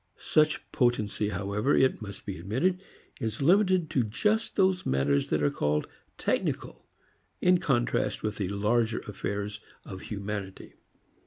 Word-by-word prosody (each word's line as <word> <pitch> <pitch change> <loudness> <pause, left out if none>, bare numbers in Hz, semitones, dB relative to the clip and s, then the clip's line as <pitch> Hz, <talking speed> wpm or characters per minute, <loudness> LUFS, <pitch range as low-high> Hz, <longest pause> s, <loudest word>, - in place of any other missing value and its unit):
Such 155 0 +2
potency 110 -4 +1
however, 105 +6 0
it 130 -3 +3
must 100 -2 -8
be 100 -5 -5
admitted, 135 - 0 0.4
is 110 0 -3
limited 185 +2 +4
to 130 - +2
just 210 - 0
those 190 -2 +3
matters 70 +1 +1
that 75 -1 0
are 70 - +3
called 75 +1 0 0.3
technical - - -2 0.5
in 180 0 +4
contrast 120 -6 0
with 105 -1 -2
the 100 - -1
larger 110 +3 +1
affairs 105 0 -4 0.3
of 95 -1 -8
humanity. 100 -2 -6
105 Hz, 135 wpm, -28 LUFS, 100-145 Hz, 0.5 s, limited